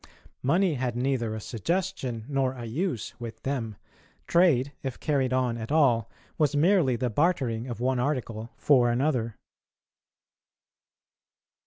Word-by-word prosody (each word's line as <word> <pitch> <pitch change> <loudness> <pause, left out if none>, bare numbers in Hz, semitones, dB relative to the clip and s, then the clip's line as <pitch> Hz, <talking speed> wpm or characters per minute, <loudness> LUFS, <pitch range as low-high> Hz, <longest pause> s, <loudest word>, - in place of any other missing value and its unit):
Money 175 +6 +2
had 125 -3 -2
neither 120 -3 0
a - - -4
suggestion 130 - -2
nor 135 -2 0
a 120 -2 -7
use 130 - -2
with 115 -2 -8
them; 120 -6 -2 0.5
trade, 150 -6 +3
if 130 -3 -5
carried 135 -4 0
on 125 -2 0
at 110 +3 -6
all, 125 -8 +3 0.3
was 150 -1 +2
merely 160 -4 +4
the 125 +2 -1
bartering 130 - +1
of 120 -2 -5
one 130 +1 +1
article 120 -4 -2
for 125 -5 +4
another. 120 -3 0
130 Hz, 130 wpm, -27 LUFS, 120-150 Hz, 0.5 s, merely